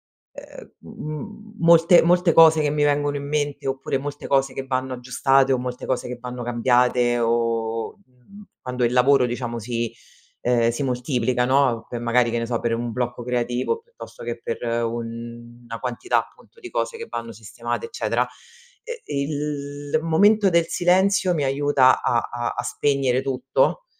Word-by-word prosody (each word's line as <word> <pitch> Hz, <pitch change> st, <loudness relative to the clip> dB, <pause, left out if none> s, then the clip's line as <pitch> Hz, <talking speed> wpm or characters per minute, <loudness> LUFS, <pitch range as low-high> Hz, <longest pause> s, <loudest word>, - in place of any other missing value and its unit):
ehm, -, -, -14 dB
m 155 Hz, -, -8 dB
m 215 Hz, +1 st, -11 dB
molte 170 Hz, +1 st, +6 dB
molte 175 Hz, 0 st, +3 dB
cose 160 Hz, -1 st, +7 dB
che 145 Hz, -, +1 dB
mi 150 Hz, 0 st, 0 dB
vengono 145 Hz, 0 st, +1 dB
in 140 Hz, -, -7 dB
mente 145 Hz, -2 st, -2 dB
oppure 135 Hz, 0 st, -2 dB
molte 145 Hz, +1 st, -6 dB
cose 135 Hz, -1 st, +1 dB
che 135 Hz, -, -4 dB
vanno 130 Hz, 0 st, -2 dB
aggiustate 135 Hz, +2 st, +2 dB
o 130 Hz, -, +2 dB
molte 125 Hz, 0 st, -5 dB
cose 130 Hz, -1 st, -2 dB
che 125 Hz, -, -5 dB
vanno 125 Hz, 0 st, -7 dB
cambiate 120 Hz, 0 st, +2 dB
o, 115 Hz, -1 st, -1 dB
mhmm, 195 Hz, +9 st, -17 dB, 0.2 s
quando 125 Hz, -1 st, -2 dB
il 120 Hz, -, +1 dB
lavoro 130 Hz, +1 st, +4 dB
diciamo 120 Hz, -1 st, -4 dB
si 115 Hz, 0 st, -3 dB, 0.5 s
ehm, 120 Hz, -1 st, +2 dB
si 120 Hz, +4 st, -3 dB
moltiplica, 125 Hz, -1 st, 0 dB
no, 130 Hz, -3 st, +2 dB
per 120 Hz, -, -6 dB
magari, 120 Hz, 0 st, +2 dB
che 120 Hz, -, -1 dB
ne 115 Hz, -, -2 dB
so, 120 Hz, 0 st, -1 dB
per 115 Hz, -1 st, 0 dB
un 120 Hz, 0 st, -3 dB
blocco 120 Hz, 0 st, -3 dB
creativo 125 Hz, -, -1 dB
piuttosto 475 Hz, +1 st, -13 dB
che 120 Hz, 0 st, -5 dB
per 115 Hz, -, -4 dB, 0.3 s
una 115 Hz, 0 st, -7 dB
quantità, 125 Hz, -1 st, -1 dB
appunto, 460 Hz, -, -23 dB
di 365 Hz, -, -9 dB
cose 460 Hz, -, -2 dB
che 460 Hz, -, -8 dB
vanno 115 Hz, 0 st, -5 dB
sistemate, 115 Hz, -, -5 dB
eccetera 455 Hz, -, -1 dB, 0.6 s
e 475 Hz, -1 st, -8 dB
e 140 Hz, -, -3 dB
il 145 Hz, 0 st, -3 dB
momento 200 Hz, +6 st, +4 dB
del 170 Hz, -2 st, +3 dB
silenzio 185 Hz, +1 st, +2 dB
mi 150 Hz, -4 st, 0 dB
aiuta 135 Hz, -1 st, +3 dB
a 120 Hz, -, +1 dB
a 120 Hz, 0 st, -3 dB
a -, -, -2 dB
spegnere 135 Hz, -3 st, 0 dB
tutto 135 Hz, -, 0 dB
130 Hz, 170 wpm, -23 LUFS, 120-145 Hz, 0.6 s, cose